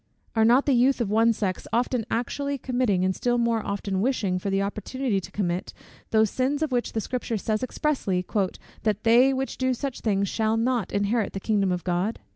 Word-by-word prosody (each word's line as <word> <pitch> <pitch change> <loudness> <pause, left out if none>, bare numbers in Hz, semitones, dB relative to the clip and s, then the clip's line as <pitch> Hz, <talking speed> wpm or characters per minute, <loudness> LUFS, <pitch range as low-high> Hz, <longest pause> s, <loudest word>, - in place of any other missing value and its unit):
Are 220 - +4
not 245 +5 +5
the 280 - +3
youth 255 +2 +3
of 220 -4 -1
one 225 +2 +4
sex 200 -4 -2
often 240 0 0
actually 280 +4 -2
committing, 245 -8 0
and 185 0 0
still 245 -1 0
more 230 -2 +1
often 200 -1 -2
wishing 205 -7 0
for 200 - -3
the 195 0 +1
opportunity 215 +2 -2
to - - -10
commit, 180 -3 -2 0.4
those 220 -2 +3
sins 280 +4 0
of 310 - -2
which 245 -1 -1
the 225 - 0
Scripture 240 -1 -3
says 215 +1 -1
expressly, 255 -9 -1 0.6
"that 215 -1 -1
they 240 +4 +6
which 265 -2 -3
do 260 -1 +1
such 270 +1 -5
things 200 -2 +1
shall 220 +2 0
not 235 -2 0
inherit 205 +2 0
the 195 - -3
kingdom 200 -2 +1
of 180 -1 -2
God?" 185 +5 -1
225 Hz, 200 wpm, -25 LUFS, 200-250 Hz, 0.6 s, they